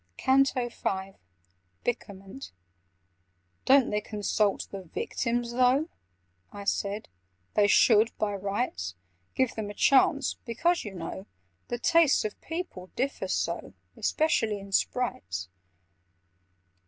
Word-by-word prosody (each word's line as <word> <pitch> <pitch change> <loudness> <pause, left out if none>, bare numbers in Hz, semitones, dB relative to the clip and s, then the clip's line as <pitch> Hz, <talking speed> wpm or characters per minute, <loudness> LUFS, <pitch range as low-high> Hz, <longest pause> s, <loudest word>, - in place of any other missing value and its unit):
CANTO 265 -2 +3
V 190 -4 -3 0.7
Byckerment 200 0 -5 1.1
"DON'T 270 -1 +5
they 210 0 0
consult 210 -1 0
the 195 - -6
'Victims,' 235 +7 -2
though?" 255 +6 +3 0.6
I 205 0 -8
said. 200 +1 -1 0.5
"They 205 -1 +4
should, 220 +1 +5
by 210 -1 0
rights, 195 - -2 0.4
Give 260 -2 +1
them 215 -2 -4
a 205 - -8
chance—because, 275 - +2
you 200 -2 -7
know, 180 +3 -6 0.4
The 240 - -2
tastes 325 +1 +4
of 215 - -5
people 325 - -5
differ 270 +3 -2
so, - - -2 0.2
Especially 225 -10 +1
in 195 0 -11
Sprites." 95 - -1
215 Hz, 105 wpm, -28 LUFS, 200-260 Hz, 1.1 s, DON'T